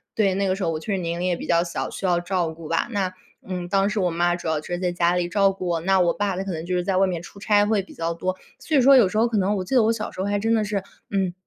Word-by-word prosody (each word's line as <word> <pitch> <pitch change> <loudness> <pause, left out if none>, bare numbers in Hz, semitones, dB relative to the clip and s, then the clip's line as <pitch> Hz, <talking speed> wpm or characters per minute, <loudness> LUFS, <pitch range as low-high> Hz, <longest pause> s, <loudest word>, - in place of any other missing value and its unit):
对， 200 -3 +2
那 200 0 0
个 185 - +1
时 195 - -4
候 170 - +1
我 155 - -3
确 205 - -5
实 - - 0
年 170 -1 -3
龄 180 - -1
也 180 - +1
比 - - -7
较 170 0 +3
小， 170 - -4
需 - - -6
要 175 -2 +2
照 175 -1 -1
顾 160 0 -10
吧。 165 - 0
那， 195 -4 -1 0.3
嗯， 180 -2 -4
当 195 +1 +2
时 210 -1 -1
我 180 -1 +1
妈 175 +1 +1
主 175 -2 -4
要 155 -1 0
是 175 +3 -4
在 180 -1 0
家 175 0 +1
里 175 -1 -1
照 195 0 +3
顾 190 -1 -7
我， 170 -1 0
那 190 +3 +2
我 175 -1 +3
爸 205 -2 -1
他 190 - -3
可 195 - -4
能 160 -1 -5
就 180 +1 -1
是 180 - 0
在 185 +1 0
外 195 +1 +4
面 175 -3 -3
出 200 +3 -12
差 205 0 +3
会 210 -1 +1
比 190 - -14
较 165 0 -2
多。 185 +2 -2 0.2
所 310 - -2
以 275 - +6
说 270 +2 +7
有 230 -6 +6
时 200 - -3
候 225 +2 +4
可 225 - 0
能 200 +1 +1
我 185 - -2
记 185 - -3
得 245 - +6
我 225 +1 +3
小 215 -2 -4
时 - - -12
候 190 - 0
还 205 0 0
真 225 +2 +1
的 220 -2 +2
是， 205 -2 -2 0.3
嗯， 190 -3 0
185 Hz, 370 characters per minute, -23 LUFS, 175-205 Hz, 0.3 s, 说